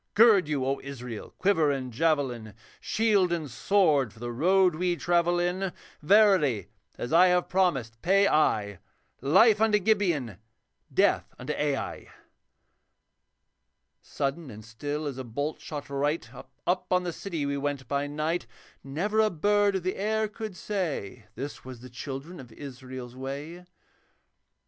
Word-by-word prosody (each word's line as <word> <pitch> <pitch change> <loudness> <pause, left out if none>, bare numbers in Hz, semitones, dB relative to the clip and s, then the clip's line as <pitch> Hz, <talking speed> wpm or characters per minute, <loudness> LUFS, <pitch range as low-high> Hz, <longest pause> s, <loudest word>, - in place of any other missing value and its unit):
Gird 210 -6 +6
you, 145 -4 -1
O 135 +1 0
Israel, 125 -5 -7
quiver 185 -6 +3
and 130 -3 -3
javelin, 125 -7 0 0.2
Shield 210 -5 +2
and 165 -3 -1
sword 145 - +2
for - - -20
the 120 +1 -4
road 180 +8 +3
we 175 +2 0
travel 175 0 +2
in; 180 +2 -1 0.3
Verily, 160 - +4 0.3
as 120 - -4
I 180 +3 +7
have 180 0 +2
promised, 135 -12 0
pay 195 +3 +4
I 105 - +1 0.4
Life 195 - +5
unto 220 -1 +4
Gibeon, 175 - 0 0.5
death - - +2
unto 135 +4 -4
Ai.' 145 -2 -2 1.9
Sudden 140 +2 -3
and 110 -2 -10
still 145 +7 -4
as 135 -3 -4
a - - -4
bolt 145 +6 -4
shot 145 -2 -6
right 145 +3 -1
Up 180 0 -4
on 180 0 +3
the 175 -1 -3
city 165 -7 -4
we 140 0 -1
went 140 -2 -3
by 140 +2 -1
night. 155 +1 -2 0.4
Never 180 +11 -1
a 215 0 +4
bird 205 +3 +2
of 190 - -2
the 185 - -2
air 220 +2 0
could 215 -2 -7
say, 140 - -4
'This 140 +4 -6
was 130 -2 -10
the 130 -1 -11
children 140 +7 -7
of 125 -3 -11
Israel's 130 -2 -9
way.' 145 +7 -6
150 Hz, 145 wpm, -27 LUFS, 130-185 Hz, 1.9 s, I